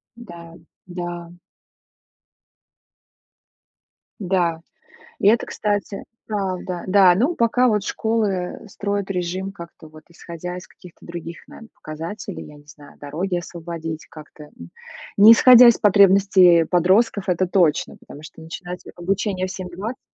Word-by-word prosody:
Да, 170 Hz, -8 st, -12 dB, 0.3 s
да. 175 Hz, -1 st, -7 dB, 2.9 s
Да. 175 Hz, -4 st, -1 dB, 0.6 s
И 200 Hz, -, +4 dB
это, 225 Hz, +2 st, +2 dB
кстати, 205 Hz, -1 st, -3 dB, 0.2 s
правда. 185 Hz, -4 st, -4 dB
Да, 190 Hz, -2 st, +5 dB
ну, 255 Hz, -, 0 dB
пока 245 Hz, +2 st, +2 dB
вот 210 Hz, -3 st, 0 dB
школы 210 Hz, -5 st, -2 dB
строят 200 Hz, -1 st, -4 dB
режим 185 Hz, +1 st, -3 dB
как-то 170 Hz, -3 st, -13 dB
вот 155 Hz, 0 st, -16 dB
исходя 170 Hz, +1 st, -8 dB
из 180 Hz, +1 st, -10 dB
каких-то 180 Hz, -4 st, -18 dB
других, 170 Hz, 0 st, -8 dB
наверно, 225 Hz, -, -14 dB
показателей, 165 Hz, +6 st, -8 dB
я 150 Hz, -, -14 dB
не 145 Hz, 0 st, -19 dB
знаю, 145 Hz, -1 st, -16 dB
дороги 170 Hz, +6 st, -4 dB
освободить 165 Hz, -2 st, -7 dB
как-то. 150 Hz, -1 st, -14 dB, 0.7 s
Не 210 Hz, +3 st, +9 dB
исходя 245 Hz, +1 st, +8 dB
из 235 Hz, -, +4 dB
потребностей 190 Hz, -4 st, +5 dB
подростков, 190 Hz, +4 st, +1 dB
это 185 Hz, +1 st, +1 dB
точно, 175 Hz, -4 st, +1 dB
потому 145 Hz, -, -14 dB
что 155 Hz, -, -13 dB
начинать 175 Hz, +2 st, -8 dB
обучение 185 Hz, +1 st, -2 dB
в -, -, -8 dB
7:20. 190 Hz, +6 st, -7 dB
180 Hz, 120 wpm, -21 LUFS, 170-200 Hz, 2.9 s, Не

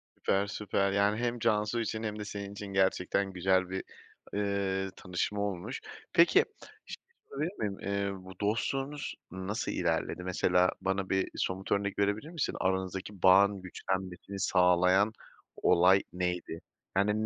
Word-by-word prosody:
Süper, 100 Hz, +1 st, +1 dB
süper, 100 Hz, -1 st, 0 dB
yani 100 Hz, +2 st, +2 dB
hem 120 Hz, 0 st, -1 dB
Cansu 110 Hz, 0 st, +1 dB
için 110 Hz, 0 st, -2 dB
hem 105 Hz, -1 st, -3 dB
de 105 Hz, -, -4 dB
senin 100 Hz, -1 st, -6 dB
için 105 Hz, 0 st, -7 dB
gerçekten 95 Hz, 0 st, +1 dB
güzel 95 Hz, 0 st, +2 dB
bir, 95 Hz, 0 st, -3 dB, 0.5 s
ııı, 100 Hz, -1 st, -1 dB
tanışma 95 Hz, +3 st, -2 dB
olmuş. 100 Hz, -4 st, -3 dB, 0.3 s
Peki, -, -, +6 dB, 0.5 s
bir -, -, -11 dB
şey -, -, -9 dB, 0.3 s
sorabilir 150 Hz, +5 st, -2 dB, 0.3 s
miyim? 100 Hz, -1 st, -2 dB
Bu 95 Hz, 0 st, -12 dB
dostluğunuz 135 Hz, +7 st, -1 dB, 0.2 s
nasıl 95 Hz, +4 st, -3 dB
ilerledi? 85 Hz, +1 st, -1 dB
Mesela 90 Hz, 0 st, +2 dB
bana 95 Hz, 0 st, -1 dB
bir 95 Hz, 0 st, +1 dB
somut 95 Hz, +1 st, -2 dB
örnek 100 Hz, 0 st, 0 dB
verebilir 100 Hz, +8 st, 0 dB
misin? 165 Hz, -4 st, -2 dB
Aranızdaki 95 Hz, 0 st, -2 dB
bağın 100 Hz, +1 st, +6 dB
güçlenmesini 95 Hz, +1 st, -4 dB
sağlayan, 90 Hz, +3 st, +4 dB, 0.4 s
olay 95 Hz, +3 st, +5 dB
neydi? 90 Hz, -2 st, -3 dB, 0.4 s
Yani 100 Hz, +2 st, +3 dB
95 Hz, 135 wpm, -31 LUFS, 95-105 Hz, 0.5 s, Peki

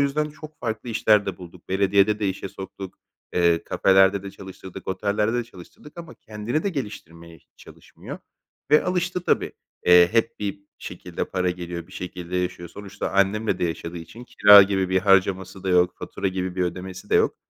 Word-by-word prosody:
yüzden 150 Hz, +2 st, 0 dB
çok 155 Hz, 0 st, -12 dB
farklı 110 Hz, +1 st, -4 dB
işler 105 Hz, -2 st, +3 dB
de 95 Hz, -3 st, -3 dB
bulduk. 90 Hz, -1 st, -13 dB
Belediyede 100 Hz, +2 st, +3 dB
de 105 Hz, -2 st, 0 dB
işe 95 Hz, 0 st, -4 dB
soktuk, 95 Hz, 0 st, -9 dB, 0.4 s
eee, 85 Hz, -1 st, +2 dB
kafelerde 95 Hz, 0 st, +3 dB
de 100 Hz, -, -7 dB
çalıştırdık, 95 Hz, -1 st, -11 dB
otellerde 105 Hz, +4 st, 0 dB
de 120 Hz, -, 0 dB
çalıştırdık 120 Hz, -, -15 dB
ama 170 Hz, -1 st, -9 dB
kendini 110 Hz, +8 st, -4 dB
de 200 Hz, -, 0 dB
geliştirmeye 85 Hz, -, -7 dB
hiç -, -, -29 dB
çalışmıyor -, -, -12 dB, 0.5 s
ve 150 Hz, -, +5 dB
alıştı 180 Hz, 0 st, -1 dB
tabii. -, -, +1 dB, 0.3 s
Eee, 90 Hz, -1 st, +7 dB
hep 115 Hz, 0 st, +1 dB
bir 100 Hz, -1 st, -3 dB, 0.2 s
şekilde 90 Hz, -2 st, -6 dB
para 90 Hz, -1 st, -1 dB
geliyor, 85 Hz, -1 st, -6 dB
bir 95 Hz, -, -18 dB
şekilde 90 Hz, 0 st, -6 dB
yaşıyor. 90 Hz, -1 st, -3 dB
Sonuçta 100 Hz, +1 st, -6 dB
annemle 100 Hz, +3 st, +1 dB
de -, -, 0 dB
yaşadığı 85 Hz, +1 st, -4 dB
için 115 Hz, +9 st, -11 dB
kira 105 Hz, -4 st, +8 dB
gibi 95 Hz, -1 st, 0 dB
bir 95 Hz, 0 st, +2 dB
harcaması 95 Hz, 0 st, +2 dB
da -, -, -2 dB
yok, 90 Hz, 0 st, +3 dB
fatura 95 Hz, -, -3 dB
gibi 95 Hz, 0 st, -4 dB
bir 90 Hz, -, +1 dB
ödemesi 95 Hz, +2 st, -5 dB
de -, -, +2 dB
yok. -, -, +3 dB
95 Hz, 180 wpm, -24 LUFS, 90-105 Hz, 0.5 s, kira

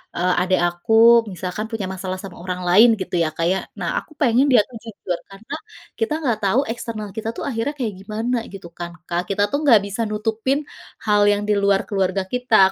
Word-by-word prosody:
eee, 180 Hz, +1 st, +1 dB
adek 185 Hz, +1 st, +2 dB
aku 175 Hz, +5 st, -3 dB, 0.4 s
misalkan 185 Hz, +3 st, -4 dB
punya 220 Hz, -3 st, -3 dB
masalah 190 Hz, 0 st, -4 dB
sama 195 Hz, -2 st, -9 dB
orang 180 Hz, +1 st, -4 dB
lain 215 Hz, +7 st, +7 dB
gitu 180 Hz, -1 st, -2 dB
ya, 155 Hz, -, 0 dB
Kak 165 Hz, -, -2 dB
ya, 190 Hz, +1 st, +1 dB, 0.2 s
nah 175 Hz, -2 st, -2 dB
aku -, -, -16 dB
pengen 255 Hz, +1 st, +4 dB
dia 240 Hz, -4 st, +7 dB
tuh 245 Hz, -, -11 dB
jujur, 195 Hz, -6 st, -5 dB
karena 195 Hz, +3 st, -8 dB, 0.4 s
kita 450 Hz, -7 st, 0 dB
nggak 235 Hz, -5 st, 0 dB
tahu 230 Hz, +7 st, +3 dB
eksternal 225 Hz, -3 st, -5 dB
kita 220 Hz, 0 st, -2 dB
itu -, -, -6 dB
akhirnya 250 Hz, +4 st, -2 dB
kayak 225 Hz, -5 st, -2 dB
gimana 220 Hz, +5 st, -2 dB, 0.2 s
gitu 185 Hz, -3 st, -9 dB
kan 175 Hz, 0 st, -7 dB, 0.2 s
Kak, 175 Hz, +1 st, 0 dB
kita 200 Hz, +1 st, +1 dB
tuh 285 Hz, -, +1 dB
enggak 225 Hz, -6 st, +7 dB
bisa 210 Hz, +4 st, -4 dB
nutupin 225 Hz, +7 st, -1 dB, 0.4 s
hal 210 Hz, -1 st, +3 dB
yang 205 Hz, 0 st, 0 dB
di -, -, +4 dB
luar 200 Hz, -1 st, +2 dB
keluarga 195 Hz, -1 st, 0 dB
kita. 220 Hz, -3 st, +3 dB
205 Hz, 205 wpm, -21 LUFS, 185-230 Hz, 0.4 s, lain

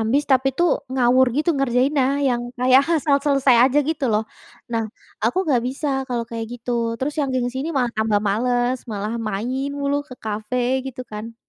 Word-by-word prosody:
ambis 250 Hz, +7 st, +1 dB
tapi 265 Hz, -1 st, +3 dB
tuh 345 Hz, -1 st, +2 dB
ngawur 260 Hz, 0 st, +4 dB
gitu 310 Hz, +4 st, +2 dB
ngerjainnya, 275 Hz, +1 st, +1 dB
yang 240 Hz, 0 st, -2 dB
kayak 255 Hz, +2 st, +5 dB
asal 290 Hz, -2 st, +2 dB
selesai 275 Hz, -3 st, +3 dB, 0.2 s
aja 290 Hz, -, +2 dB
gitu 315 Hz, -2 st, -1 dB
loh. 215 Hz, +1 st, +1 dB, 0.5 s
Nah, 230 Hz, -1 st, +1 dB, 0.4 s
aku 365 Hz, -, +1 dB
nggak 255 Hz, -6 st, +2 dB
bisa 275 Hz, +3 st, -3 dB, 0.2 s
kalau 240 Hz, -2 st, -2 dB
kayak 230 Hz, -1 st, -4 dB
gitu, 240 Hz, +2 st, -6 dB, 0.3 s
terus 285 Hz, +4 st, -2 dB
yang 275 Hz, -2 st, -1 dB
geng 250 Hz, -1 st, 0 dB
sini 270 Hz, +4 st, -3 dB
malah 245 Hz, -3 st, +1 dB
tambah 220 Hz, -1 st, +1 dB
males 245 Hz, +4 st, +1 dB
malah 210 Hz, +1 st, -3 dB
main 235 Hz, +6 st, -2 dB
mulu 280 Hz, 0 st, 0 dB
ke 255 Hz, -, -9 dB
kafe 240 Hz, +5 st, -2 dB
gitu 255 Hz, -1 st, -6 dB
kan. 220 Hz, +2 st, -8 dB
255 Hz, 180 wpm, -21 LUFS, 230-275 Hz, 0.5 s, kayak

